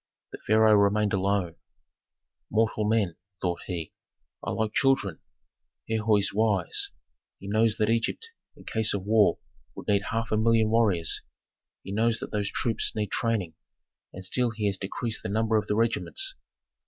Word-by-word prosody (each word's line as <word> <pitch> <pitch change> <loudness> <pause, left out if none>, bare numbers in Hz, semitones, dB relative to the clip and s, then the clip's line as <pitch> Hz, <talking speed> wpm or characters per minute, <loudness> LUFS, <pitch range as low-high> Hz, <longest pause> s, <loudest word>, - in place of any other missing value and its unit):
The - - -8
pharaoh 110 0 +5
remained 105 0 +3
alone. 95 -3 0 0.9
"Mortal 110 0 +1
men," 105 -7 +1 0.2
thought 90 -2 -2
he, 85 -4 -4 0.5
"are - - -3
like 110 -1 -1
children. 120 - +2 0.7
Herhor 110 -1 +2
is 100 -1 0
wise: 105 -4 +1 0.5
he 100 - -10
knows 110 +1 +2
that 110 - +2
Egypt 115 - -1 0.3
in - - -15
case 110 -2 0
of 95 - -3
war 105 -1 +4 0.4
would - - -9
need 100 0 +2
half 115 0 -2
a 110 - +2
million 115 0 +4
of 110 - -1
warriors; 100 -8 +2 0.6
he 95 - -7
knows 115 +2 +2
that - - -7
those 100 -1 -1
troops 115 -3 -1
need 105 -2 -2
training, 110 -9 -1 0.6
and 95 +1 -8
still 125 +6 0
he 110 -2 -4
has 100 -1 +1
decreased 110 +3 -4
the 110 - -4
number 110 +2 +1
of 105 - +1
the 105 - 0
regiments. 115 - 0
110 Hz, 165 wpm, -27 LUFS, 100-115 Hz, 0.9 s, pharaoh